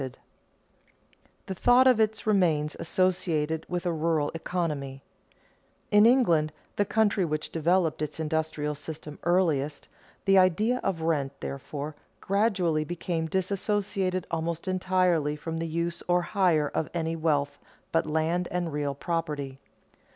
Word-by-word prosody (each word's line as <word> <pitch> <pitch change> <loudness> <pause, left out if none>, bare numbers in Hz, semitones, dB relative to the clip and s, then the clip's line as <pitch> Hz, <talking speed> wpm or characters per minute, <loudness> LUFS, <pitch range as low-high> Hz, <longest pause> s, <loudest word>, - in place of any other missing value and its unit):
[Sidenote: 130 -2 -6 1.3
The 190 - -4
thought 245 +7 +5
of 255 -3 +5
it 220 0 +1
remains 165 -8 +2
associated 160 -3 0
with 180 0 -3
a 175 - +1
rural 160 -2 0
economy] 150 -6 -3 0.9
In 210 +2 +7
England, 170 -12 +3 0.2
the 205 - +2
country 210 -2 +2
which 155 -2 -2
developed 165 0 +1
its 150 +1 -4
industrial 155 -1 -1
system 150 0 -8
earliest, 160 -5 +1 0.4
the 195 -1 +6
idea 210 +7 +3
of 180 -4 -1
rent, 140 -4 -1
therefore, 145 +2 -5 0.2
gradually 190 -6 +1
became 165 0 -3
disassociated 190 0 -1
almost 165 +2 -2
entirely 185 -5 +1
from 165 +2 -5
the 165 0 -2
use 170 +1 -2
or 175 0 +3
hire 175 -7 +2
of 160 - -1
any 165 -1 -1
wealth 145 -3 0 0.3
but 165 -1 +1
land 160 +3 0
and 175 -3 -2
real 145 -1 -1
property. 150 -4 -3
165 Hz, 130 wpm, -27 LUFS, 150-185 Hz, 1.3 s, In